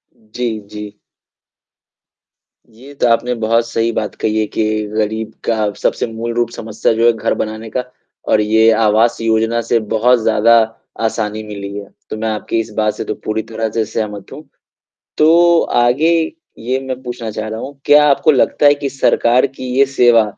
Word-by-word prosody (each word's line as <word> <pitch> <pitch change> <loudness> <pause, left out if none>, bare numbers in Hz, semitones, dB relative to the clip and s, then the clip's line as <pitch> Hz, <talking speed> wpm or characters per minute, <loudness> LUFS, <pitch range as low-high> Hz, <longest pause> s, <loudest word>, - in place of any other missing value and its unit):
जी, 110 +1 -5
जी। 105 -1 -8 1.8
ये 130 +6 -14
तो 135 - 0
आपने 120 +1 +1
बहुत 115 +1 +1
सही 115 0 0
बात 110 -2 -3
कही 110 0 0
है 110 - +1
कि 110 - -2 0.2
गरीब 110 +1 -2
का 110 -2 0
सबसे - - 0
मूल 115 +1 -5
रूप 120 -1 0
समस्या 110 -1 -2
जो 115 +1 +1
है 120 - +5
घर 115 0 -1
बनाने 110 +1 -5
का 125 - -2 0.5
और 105 - +4
ये 110 +1 +4
आवास 110 +1 +2
योजना 115 +1 +1
से 115 - +3
बहुत 120 +3 +3
ज़्यादा 115 +2 +4 0.4
आसानी 110 -1 -2
मिली 100 -1 -7
है। 100 -1 -7 0.2
तो 110 - -5
मैं 110 +1 -2
आपकी 110 +1 -2
इस 115 - -3
बात 105 -1 +1
से - - -4
तो - - -3
पूरी 110 +1 -1
तरह 110 0 -2
से 110 0 -1
सहमत 105 -2 -5
हूँ। - - -10 0.8
तो 170 +2 +5 0.2
आगे 140 +8 +3 0.5
ये 125 +3 -2
मैं 130 -1 -4
पूछना 120 -3 -5
चाह 110 +1 -5
रहा 110 +1 -5
हूँ 140 +2 -8
क्या 150 0 +6
आपको 150 +3 +3
लगता 145 +2 +2
है 145 - +7
कि 145 -1 -4
सरकार 125 -1 +2
की 130 -1 -10
ये 140 - +5
सेवा 120 -4 +4
115 Hz, 180 wpm, -16 LUFS, 110-125 Hz, 1.8 s, है